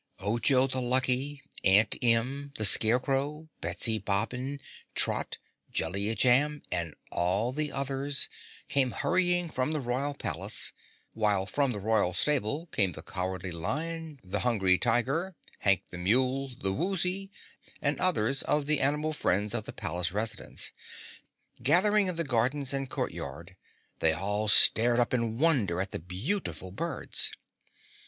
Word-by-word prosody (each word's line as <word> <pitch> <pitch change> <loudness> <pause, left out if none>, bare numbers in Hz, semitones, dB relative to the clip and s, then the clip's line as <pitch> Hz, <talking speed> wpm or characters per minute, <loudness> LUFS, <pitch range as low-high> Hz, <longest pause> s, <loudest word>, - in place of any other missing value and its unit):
Ojo 120 +6 +2
the 130 -1 -2
Lucky, 130 +3 +2 0.2
Aunt 100 +2 +4
Em, 125 +4 +1
the 110 - +1
Scarecrow, 135 +8 +3
Betsy 110 -2 -1
Bobbin, 125 +8 -2 0.4
Trot, - - +2 0.3
Jellia 100 +6 -1
Jamb, 145 +5 +3
and 85 -3 -3 0.2
all 95 +7 0
the 150 +2 -1
others 140 +1 +1 0.4
came 135 -2 +2
hurrying 175 -1 +1
from 130 +4 -1
the 155 - -1
Royal 135 +3 -2
Palace, 100 - -3 0.4
while 105 -3 +1
from 140 +5 0
the 110 - -4
Royal 100 -3 0
Stable 145 - 0
came 95 -4 +1
the - - -8
Cowardly 95 0 -4
Lion, 155 - -4
the 95 - -2
Hungry 95 -7 +2
Tiger, 135 - +1 0.2
Hank 100 -2 +3
the 90 - -7
Mule, 130 +7 0
the 95 -5 -1
Woozy 185 - 0 0.5
and 145 0 0
others 135 -8 +3
of 150 -1 0
the 150 0 +1
animal 150 +3 +1
friends 105 -5 0
of 110 -3 -2
the - - -6
palace 85 +1 -3
residents. 110 +2 -3 0.9
Gathering 195 +7 +4
in 180 - 0
the 170 - -1
gardens 135 +1 0
and 135 -1 -2
court - - -3
yard, - - -8 0.4
they 80 -1 +2
all 105 +5 -2
stared 120 +3 +6
up 120 - +1
in 115 -2 -1
wonder 125 - +2
at 95 +1 -2
the - - -5
beautiful 95 - -4
birds. 95 - -1
125 Hz, 140 wpm, -28 LUFS, 100-145 Hz, 0.9 s, stared